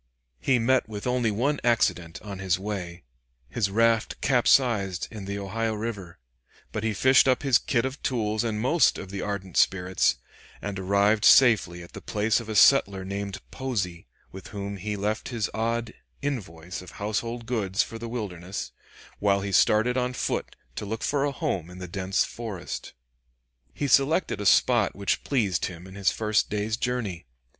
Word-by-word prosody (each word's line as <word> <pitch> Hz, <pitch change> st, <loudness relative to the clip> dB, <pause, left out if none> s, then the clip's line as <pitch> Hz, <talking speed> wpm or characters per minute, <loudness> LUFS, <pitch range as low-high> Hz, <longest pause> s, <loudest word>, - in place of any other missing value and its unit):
He 130 Hz, -, +2 dB
met 120 Hz, 0 st, +2 dB
with 105 Hz, -2 st, -6 dB
only 125 Hz, -2 st, +1 dB
one 130 Hz, +8 st, 0 dB
accident 90 Hz, -8 st, +1 dB
on 100 Hz, -3 st, -7 dB
his 95 Hz, -1 st, +1 dB
way: 95 Hz, -3 st, -5 dB, 0.5 s
his 105 Hz, -5 st, 0 dB
raft 115 Hz, +2 st, +2 dB
capsized 120 Hz, -8 st, +2 dB
in 105 Hz, -4 st, -7 dB
the 100 Hz, +1 st, -4 dB
Ohio 110 Hz, +3 st, -2 dB
River, 105 Hz, -6 st, -5 dB, 0.5 s
but 110 Hz, -, -4 dB
he 110 Hz, -, +1 dB
fished 130 Hz, +6 st, +5 dB
up 130 Hz, 0 st, +2 dB
his 135 Hz, -2 st, +4 dB
kit 120 Hz, -1 st, 0 dB
of 135 Hz, +2 st, -5 dB
tools 110 Hz, -4 st, 0 dB
and 110 Hz, -2 st, -2 dB
most 140 Hz, +9 st, +3 dB
of 95 Hz, -, -8 dB
the 100 Hz, -1 st, -4 dB
ardent 100 Hz, -3 st, -4 dB
spirits, 95 Hz, 0 st, +2 dB, 0.4 s
and 100 Hz, -2 st, -5 dB
arrived 100 Hz, +3 st, +2 dB
safely 100 Hz, -9 st, +5 dB
at 85 Hz, -, -13 dB
the -, -, -8 dB
place 105 Hz, +1 st, +1 dB
of 115 Hz, -2 st, -9 dB
a 110 Hz, -, -3 dB
settler 100 Hz, -4 st, +5 dB
named 100 Hz, 0 st, -4 dB
Posey, 100 Hz, -10 st, -3 dB, 0.2 s
with 95 Hz, -, -10 dB
whom 100 Hz, -2 st, -5 dB
he 105 Hz, +3 st, -3 dB
left 105 Hz, +2 st, -2 dB
his 115 Hz, -4 st, -2 dB
odd 115 Hz, +1 st, -1 dB, 0.3 s
invoice 90 Hz, -, -4 dB
of 90 Hz, -, -12 dB
household 115 Hz, +3 st, -3 dB
goods 105 Hz, -4 st, 0 dB
for 115 Hz, -, -8 dB
the 115 Hz, 0 st, -6 dB
wilderness, 95 Hz, -6 st, -5 dB, 0.5 s
while 100 Hz, -1 st, +2 dB
he 100 Hz, 0 st, -3 dB
started 110 Hz, +6 st, +3 dB
on 125 Hz, 0 st, 0 dB
foot -, -, -2 dB, 0.2 s
to -, -, -3 dB
look 110 Hz, +2 st, -4 dB
for 145 Hz, -1 st, +1 dB
a 145 Hz, -, 0 dB
home 90 Hz, -9 st, -3 dB
in 90 Hz, -, -11 dB
the 90 Hz, 0 st, -7 dB
dense 95 Hz, +2 st, 0 dB
forest. 110 Hz, -6 st, -6 dB, 0.8 s
He 145 Hz, -, -3 dB
selected 140 Hz, -, +2 dB
a 100 Hz, -, +1 dB
spot 115 Hz, +1 st, +4 dB
which 100 Hz, 0 st, -1 dB
pleased 105 Hz, -10 st, 0 dB
him 90 Hz, -1 st, -7 dB
in 95 Hz, -, -11 dB
his 100 Hz, -1 st, +1 dB
first 110 Hz, -1 st, +1 dB
day's 105 Hz, +1 st, -1 dB
journey. 110 Hz, -, -3 dB
105 Hz, 175 wpm, -26 LUFS, 95-120 Hz, 0.8 s, fished